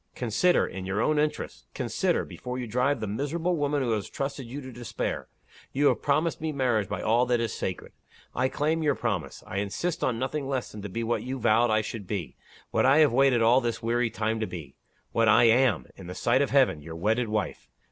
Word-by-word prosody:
Consider! 125 +10 +2
in 95 0 -6
your 95 +2 -1
own 150 +6 +2
interests, 150 - -2
consider - - 0
before 125 0 -6
you 125 - -3
drive 125 +5 +1
the - - -1
miserable 145 - -1
woman 145 -2 0
who 120 - 0
has 105 -3 -1
trusted 135 -2 -4
you 130 +5 -6
to 130 -2 -8
despair. 120 -1 -4 0.5
You 145 +2 +4
have - - 0
promised 155 +3 +1
me 160 0 -1
marriage 125 -8 0
by 100 -3 -3
all 120 +3 +3
that 120 -1 +2
is 115 -1 -1
sacred. 95 - -4 0.4
I 130 +2 +1
claim 155 +4 0
your 145 -3 +2
promise. 105 -9 -3
I 95 - -5
insist 105 - -2
on 120 -3 +1
nothing 135 +3 -2
less 135 -3 -2
than 105 - -8
to 105 - -6
be 115 +5 -3
what 115 +1 0
you 130 +1 -4
vowed 115 0 +3
I 110 0 +3
should 105 -2 -6
be 95 -5 -4 0.4
what - - +2
I 135 +2 +5
have 150 -6 +5
waited 130 -2 +4
all 120 +3 +5
this 120 -1 -3
weary 120 +1 +1
time 110 +2 -1
to 110 - -1
be 85 -6 -8 0.4
what 115 -1 +2
I 110 - +6
am, 115 - +4
in 95 - -11
the 90 - -6
sight 130 +3 +2
of 140 - +1
Heaven, 130 - +3
your 80 +2 -8
wedded 110 +7 0
wife. 105 -3 -3
120 Hz, 225 wpm, -27 LUFS, 110-135 Hz, 0.5 s, I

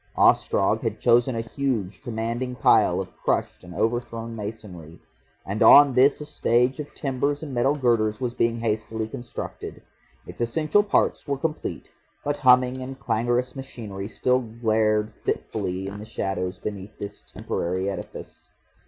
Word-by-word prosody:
Ostrog - - +3
had - - -3
chosen 120 +1 +3
a 115 - -1
huge 115 -5 -3
commanding 120 +1 -3
pile - - +4
of - - -6
crushed - - -1
and 90 0 -11
overthrown 115 0 -2
masonry, 100 -7 -8 0.5
and 100 +3 -4
on 145 -2 +8
this 135 +3 +4
a 150 - -6
stage 125 0 +1
of 150 - -7
timbers 140 +1 -1
and 145 -4 -6
metal 130 +4 +2
girders 115 -6 +1
was 125 -2 -2
being 115 -1 +1
hastily 110 0 -2
constructed. 120 +2 -7 0.5
Its - - -9
essential 155 - +2
parts 205 -5 +1
were 140 -1 -1
complete, 155 +2 -4 0.3
but 145 0 -1
humming 125 0 +4
and 130 +1 -6
clangorous 120 +1 0
machinery 110 -7 -7
still 125 +3 +1
glared 110 -2 0
fitfully 95 -3 -2
in 100 +1 -6
the 105 - -8
shadows 95 -4 -3
beneath 105 +1 -7
this 100 - -7
temporary 95 +2 -3
edifice. 100 - -7
115 Hz, 145 wpm, -25 LUFS, 105-130 Hz, 0.5 s, on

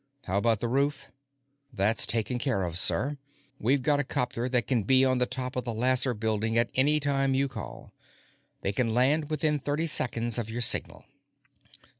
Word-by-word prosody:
"How 95 +2 -1
about 115 -1 +1
the 120 - -1
roof?" 140 +2 -1 0.6
"That's 110 0 +2
taken 115 +2 0
care 120 -7 -1
of, 85 -2 -4
sir; 140 +9 0 0.4
we've 130 +4 +1
got 145 -1 +1
'copter 125 -1 -2
that 125 -2 +1
can 125 -4 +1
be 130 +6 +4
on 130 -1 +1
the 125 - +1
top 130 0 -5
of 125 - -2
the 120 -2 -4
Lasser 125 +1 +2
Building 110 +1 -1
at 115 - +1
any 145 +4 +3
time 135 -2 0
you 135 +1 +1
call. 120 -6 -9 0.7
They 95 - -1
can 115 +1 -1
land 145 +5 +2
within 150 -1 0
thirty 145 +4 -2
seconds 120 -6 0
of 110 -2 -4
your 120 +2 -4
signal." - - 0
125 Hz, 180 wpm, -27 LUFS, 115-140 Hz, 0.7 s, be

